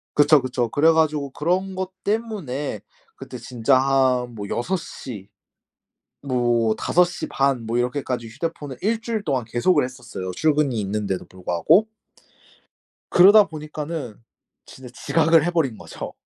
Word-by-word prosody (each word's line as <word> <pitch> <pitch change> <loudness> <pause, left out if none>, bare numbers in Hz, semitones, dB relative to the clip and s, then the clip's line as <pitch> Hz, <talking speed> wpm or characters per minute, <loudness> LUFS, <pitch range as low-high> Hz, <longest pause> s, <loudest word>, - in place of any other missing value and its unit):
그쵸, 145 0 +5
그쵸. 125 -2 -2
그래 155 +7 +4
가지고 155 -3 +1
그런 185 +7 -1
것 190 0 -4
때문에 200 - -3 0.3
그때 125 - -9
진짜 125 +2 +1
한 130 -2 +1
뭐 100 -2 -6
6 185 +11 -1
시 110 - -9 0.9
뭐 120 -4 +1
5 180 - +3
시 175 -1 -5
반 135 -3 0
뭐 115 +2 -1
이렇게까지 125 -1 -2
휴대폰을 145 +2 -5
1 225 +2 0
주일 225 -2 -3
동안 130 -5 -1
계속을 135 +8 +2
했었어요 125 -7 -7
출근이 150 - +1
있는데도 100 -1 -3
불구하고. 95 - +1 1.2
그러다 200 +4 +7
보니까는 150 -5 -6 0.5
진짜 130 -1 -12 0.2
지각을 165 -1 +4
해 175 - 0
버린 145 -10 0
거죠. - - -8
140 Hz, 275 characters per minute, -22 LUFS, 120-165 Hz, 1.2 s, 그러다